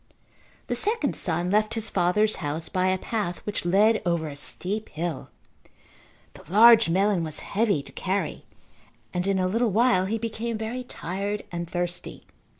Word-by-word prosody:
The - - -2
second 415 - 0
son 175 +1 -1
left 215 +2 +2
his 225 -1 -1
father's 210 +5 +2
house 155 +1 -3
by 185 0 +1
a 185 0 +2
path 200 -4 -3
which 205 -4 -3
led 210 +5 +4
over 170 -3 0
a 140 - -8
steep 200 +9 -3
hill. 160 -2 -4 1.0
The - - -13
large 225 -1 +7
melon 190 0 +2
was 155 -2 -4
heavy 205 -8 0
to - - -14
carry 190 +2 -3 0.7
and 180 +1 -1
in 195 -1 +2
a 185 - +1
little 230 +5 +1
while 215 -3 +3
he 225 +3 -1
became 230 0 -3
very 225 +4 -4
tired 200 -1 -4
and 170 -1 -4
thirsty. 175 0 -4
195 Hz, 160 wpm, -26 LUFS, 175-220 Hz, 1.0 s, large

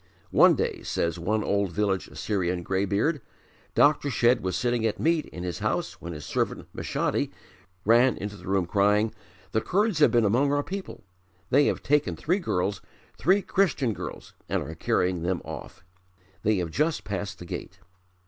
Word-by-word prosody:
"One - - +6
day," - - -2
says 85 0 -1
one 105 +5 0
old 100 -2 0
village 95 0 0
Assyrian 90 -4 -2
greybeard, 100 - 0 0.5
"Dr. 145 0 +4
Shedd 120 -1 +3
was 95 0 -2
sitting 120 -3 0
at 110 -2 0
meat 165 0 +1
in 90 - -8
his 90 -1 -4
house - - -2
when 85 - -6
his 75 -3 -7
servant, - - -2
Meshadi, - - -1 0.6
ran 120 +3 +5
into 105 0 -5
the - - -12
room 95 -2 +1
crying, 105 +4 +2 0.4
'The 110 - +1
Kurds 205 - +1
have 150 - +6
been 120 -2 +3
among 130 +8 +3
our 145 0 +1
people. 195 - -7 0.5
They 140 +3 +5
have - - -1
taken 150 +1 +2
three 180 +6 0
girls, 95 - -1 0.3
three 195 +3 +3
Christian 165 - +1
girls, - - -8 0.2
and - - 0
are - - -7
carrying 90 -1 0
them 90 +1 0
off. - - -8 0.6
They 110 +1 +2
have 85 -3 -2
just 155 - 0
passed 100 +1 -4
the 90 - -9
gate.' - - -7
110 Hz, 170 wpm, -27 LUFS, 95-145 Hz, 0.6 s, One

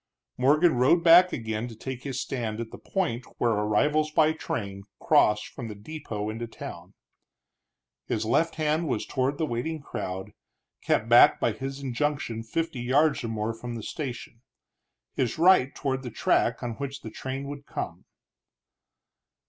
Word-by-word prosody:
Morgan 150 +3 +4
rode 140 +8 +4
back 175 +2 +8
again 110 -1 -3
to 115 - -10
take 125 +3 -6
his 135 -2 -4
stand 115 -6 -3
at 115 -1 -5
the - - -10
point 155 - -2
where 120 - +2
arrivals 125 +9 +2
by 155 0 +4
train 100 -10 -4 0.2
crossed 105 0 +3
from 120 -4 -7 0.2
depot 110 -8 -5
into 115 +2 -4
town. 115 - -9 1.1
His 110 - -1
left 165 +8 +2
hand 155 +1 0
was - - -1
toward 135 +1 -1
the 160 - 0
waiting 155 +5 -3
crowd, 95 -9 -5 0.5
kept 110 - +1
back 120 +1 +7
by 120 - +2
his 135 +5 -6
injunction 135 -3 -2
fifty 160 +5 -3
yards 140 +4 +2
or - - -2
more 110 0 -2
from 120 +1 -7
the 115 - -6
station; 120 -5 -6 0.7
his 125 -4 -1
right 170 -6 +5
toward 135 -2 -2
the 125 - -6
track 115 +2 +1
on 120 - -2
which 140 -1 -5
the 110 - -8
train 135 +4 -5
would 140 0 -8
come. - - -5
130 Hz, 155 wpm, -27 LUFS, 115-150 Hz, 1.1 s, back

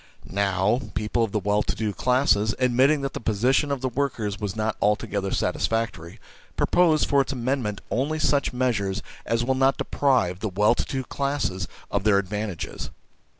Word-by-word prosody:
Now, 100 +4 +1
people 105 +3 0
of 110 - -2
the 105 - 0
well 105 +1 +1
to - - -2
do 110 -2 -2
classes, 110 -1 +2
admitting 130 +4 +3
that 135 -1 -3
the - - -4
position 120 +7 +1
of 140 -3 -2
the 130 - 0
workers 120 -6 -2
is 105 -1 -3
not 110 0 -1
altogether 100 -1 0
satisfactory, 115 -6 -2 0.4
propose 165 -4 +3
for 140 -1 +3
its 135 - -3
amendment 125 -4 -2
only 140 +6 0
such 145 -2 +1
measures 115 -6 -1 0.2
as 115 0 +1
will 130 - +2
not 135 +1 +2
deprive 120 -11 +1
the 110 - -2
well 105 +4 +3
to - - -2
do 130 -1 -3
classes 140 -11 -2 0.2
of - - 0
their 105 -2 +4
advantages. 100 -3 -4
115 Hz, 170 wpm, -25 LUFS, 100-135 Hz, 0.4 s, their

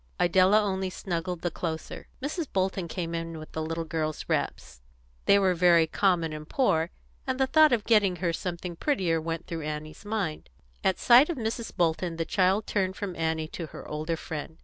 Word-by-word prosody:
Idella 185 +4 +5
only 190 -2 -1
snuggled 175 -2 -4
the 175 - -1
closer. 160 -2 -5 0.2
Mrs. 310 +2 -2
Bolton 190 -1 0
came 170 -1 -4
in 165 0 -4
with 155 0 -10
the 160 - -3
little 165 +1 -2
girl's 155 -2 -3
wraps; 65 -1 -2 0.4
they 200 - +6
were 190 -2 +3
very 170 -1 +5
common 170 -2 +1
and 155 0 -8
poor, 165 - +2 0.4
and 260 0 -1
the 265 - +4
thought 310 +3 +5
of 235 -4 +2
getting 205 -5 +3
her 175 -1 -1
something 175 0 -4
prettier 175 - 0
went 165 +1 -4
through 165 -2 -5
Annie's 155 +2 -6
mind. 205 -7 -3 0.3
At 190 - +2
sight 250 +6 +6
of 340 - -2
Mrs. 225 -1 -4
Bolton 170 0 +1
the 165 0 -2
child 190 +4 +2
turned 190 -2 -1
from 195 -4 -5
Annie 160 -1 -1
to 165 -1 -6
her - - -10
older 155 +2 -3
friend. 160 +1 -6
175 Hz, 190 wpm, -28 LUFS, 160-200 Hz, 0.4 s, they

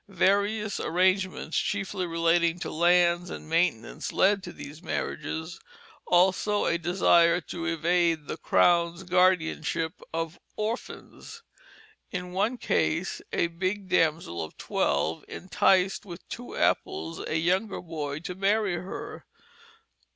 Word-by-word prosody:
Various 200 +3 +1
arrangements, 185 -1 +1
chiefly 195 -2 -1
relating 165 0 +2
to - - -4
lands 175 +1 +3
and - - -8
maintenance, 155 -4 0
led 200 +1 +3
to 180 - -8
these 150 0 -10
marriages, 160 -2 -4 0.5
also 190 +3 +3
a 170 - +1
desire 175 0 +4
to 170 +1 -6
evade 170 -1 +1
the - - -5
Crown's 170 0 +2
guardianship 170 -3 +1
of 165 0 -4 0.2
orphans. 235 - -6 0.7
In 180 -2 -5
one 210 +7 0
case, 165 -4 0
a - - +1
"bigge 185 +3 -3
damsell" 160 - +1
of 80 - -10
twelve 75 +3 0
"intysed 190 +1 +2
with 175 -3 -10
two 245 - -7
apples" 80 +1 0
a 155 - 0
younger 185 +6 0
boy 150 -4 -5
to 180 - -5
marry 195 0 +1
her. 180 +3 -7
175 Hz, 120 wpm, -27 LUFS, 165-190 Hz, 0.7 s, desire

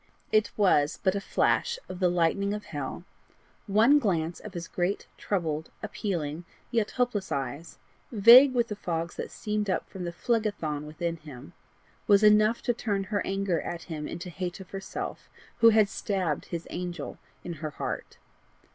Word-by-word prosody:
It 215 -1 +3
was 165 -7 +3
but 190 - +3
a 200 - -2
flash 475 - +1
of 180 - -7
the 180 -2 +3
lightning 180 +4 +1
of 210 - -6
hell: 145 +2 -5 0.6
one 225 +9 +5
glance 170 - -1
of 210 -3 -10
his 170 -1 -5
great, 180 +3 -1
troubled, 160 -5 -2
appealing, 175 -7 -3 0.3
yet 225 -4 +1
hopeless 245 -6 0
eyes, 140 +4 -4 0.3
vague 245 +5 +8
with 240 -1 +2
the 210 - -3
fogs 170 -3 -3
that - - -4
steamed 210 -1 -2
up 185 - -1
from 190 - -7
the 170 - -3
Phlegethon 175 -8 -1
within 165 +2 -3
him, 150 0 -11 0.5
was 205 0 +6
enough 215 +2 +5
to 240 - +1
turn 205 -4 -1
her 200 +1 -1
anger 195 -4 0
at 170 -1 -5
him 155 -3 -5
into 175 +2 -6
hate 180 +1 -4
of 190 - -11
herself 195 -1 -6 0.3
who 230 -1 +8
had 215 -2 +5
stabbed 190 -7 -2
his 170 -1 -5
angel 175 -4 -5 0.2
in 175 - -5
her 155 - -2
heart. 150 - -5
190 Hz, 165 wpm, -28 LUFS, 165-210 Hz, 0.6 s, vague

